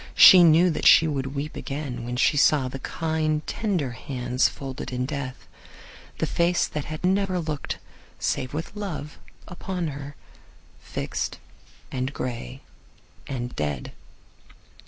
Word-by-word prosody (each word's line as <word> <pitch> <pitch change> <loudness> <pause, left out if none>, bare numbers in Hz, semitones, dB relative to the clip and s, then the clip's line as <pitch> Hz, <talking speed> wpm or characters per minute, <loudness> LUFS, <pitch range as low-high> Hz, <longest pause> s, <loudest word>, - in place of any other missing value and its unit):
She 180 -2 +10
knew 170 +2 +6
that - - +1
she 160 - +8
would 135 -2 -3
weep 145 +2 -4
again 135 -4 -5
when 120 +1 -3
she 130 - +3
saw 145 -2 +4
the 135 +1 -6
kind, 155 0 -1
tender 185 - -1
hands 125 +1 0
folded 135 -2 -7
in 125 0 -1
death; 140 -2 -5 0.7
the - - 0
face 175 +1 +2
that 150 -2 -4
had 155 +2 -6
never 190 0 +2
looked 155 -3 -3 0.4
save 130 - -1
with 160 +6 -5
love 175 -8 -5 0.3
upon 180 -2 -4
her, 140 0 -7 0.6
fixed - - -4 0.5
and 130 +1 -2
gray 115 - -5 0.7
and 125 -2 -4
dead. 75 -4 -3
145 Hz, 135 wpm, -25 LUFS, 130-165 Hz, 0.7 s, She